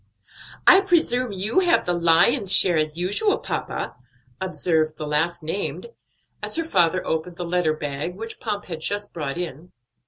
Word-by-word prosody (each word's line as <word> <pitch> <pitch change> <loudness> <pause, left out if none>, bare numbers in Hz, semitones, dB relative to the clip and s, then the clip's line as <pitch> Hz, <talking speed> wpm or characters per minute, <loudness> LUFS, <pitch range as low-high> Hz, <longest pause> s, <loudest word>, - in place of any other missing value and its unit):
"I 380 - +8
presume 255 - +1
you 200 - 0
have 350 -2 +2
the 175 - 0
lion's 175 +6 +3
share 185 -2 +6
as 155 +1 -2
usual, 205 - +1
papa," - - -4 0.5
observed 160 -4 0
the 155 - -5
last 160 +3 -1
named, 195 - -3 0.5
as - - -2
her 330 0 -1
father 185 - +2
opened 160 +2 -2
the 175 - -5
letter 170 -2 +1
bag 150 +3 -4
which 225 +3 -8
Pomp 210 -4 -4
had 165 -4 -6
just 205 +5 -3
brought 150 -3 -4
in. 175 -1 -6
180 Hz, 160 wpm, -23 LUFS, 160-210 Hz, 0.5 s, I